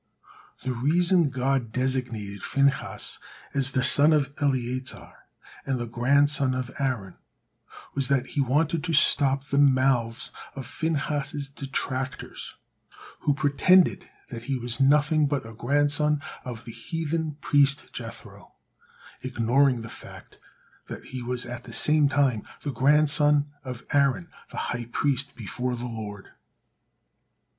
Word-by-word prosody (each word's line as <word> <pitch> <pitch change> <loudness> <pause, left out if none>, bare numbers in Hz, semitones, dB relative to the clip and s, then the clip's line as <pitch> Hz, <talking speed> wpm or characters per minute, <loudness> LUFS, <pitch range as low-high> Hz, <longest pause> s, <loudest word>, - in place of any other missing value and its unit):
The 130 0 -1
reason 170 +6 +2
God 130 -2 -1
designated 120 -6 -2
Phinehas 140 0 0 0.3
as 135 -1 +3
the 130 -1 0
son 145 +4 +5
of 140 -2 +1
Eleazar 130 -2 -2 0.5
and 135 -1 -1
the 120 - -3
grandson 135 +3 +2
of 130 0 -4
Aaron 125 -9 -2 0.7
was 135 -2 -1
that 135 -2 +1
He 145 - 0
wanted 150 +4 +1
to 165 - -2
stop 140 -2 +3
the 140 0 0
mouths 130 -4 +2 0.2
of 135 -2 -6
Phinehas's 145 -1 -2
detractors, 135 -1 -4 0.6
who 145 - +1
pretended 155 +5 +3 0.2
that 115 -2 -6
he 135 0 -1
was 120 -1 -2
nothing 150 +2 +4
but 140 -4 -2
a 115 - -9
grandson 145 +5 +1 0.2
of 115 -2 -7
the 115 - -7
heathen 160 +5 -3
priest 140 -1 +2
Jethro, - - -9 0.7
ignoring 125 0 +2
the - - -7
fact - - -13 0.5
that - - -8
he 130 -1 -6
was 125 0 0
at 120 0 -6
the 115 - -9
same 150 +1 +4
time 135 -6 +2 0.2
the 145 - -2
grandson 145 +2 +4
of 125 -3 -7
Aaron, 140 +4 +2 0.2
the - - -10 0.2
high 120 -1 -4
priest 140 +3 -1
before 125 +2 -3
the 120 +1 -5
Lord. 105 -4 -7
135 Hz, 130 wpm, -26 LUFS, 125-145 Hz, 0.7 s, son